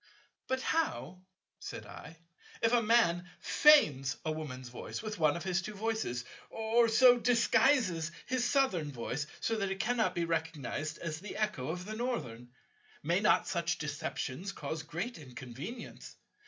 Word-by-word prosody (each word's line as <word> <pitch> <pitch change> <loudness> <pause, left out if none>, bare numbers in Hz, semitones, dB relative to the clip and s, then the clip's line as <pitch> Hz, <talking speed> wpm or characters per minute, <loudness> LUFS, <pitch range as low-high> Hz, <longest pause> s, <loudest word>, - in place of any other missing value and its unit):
"But 260 0 -1
how," 180 - -1 0.4
said - - -7
I, 165 - -11 0.5
"if 230 +1 +3
a 240 - +5
Man 195 -6 +3
feigns 145 - +5
a 155 - 0
Woman's 130 -5 -6
voice 120 - -6
with 215 -3 -5
one 155 0 +3
of 170 - -6
his 185 0 0
two 210 +2 -7
voices, 215 - -2 0.2
or 225 +1 +2
so 245 +2 +6
disguises 230 - +3
his 255 -2 0
Southern 190 - +1
voice 135 +3 -4 0.2
that 220 -4 0
it 190 0 -4
cannot 220 -4 +1
be 170 - 0
recognized 160 -2 -3
as 155 -2 -5
the 205 - -7
echo 210 -12 -1
of 180 +2 -4
the 215 +2 -5
Northern? 125 - -3 0.5
May 170 +5 +2
not 210 +1 +3
such 170 -2 -1
deceptions 150 +4 -4
cause 160 0 -4
great 175 +8 -5
inconvenience? 130 - -8
180 Hz, 150 wpm, -32 LUFS, 150-225 Hz, 0.5 s, so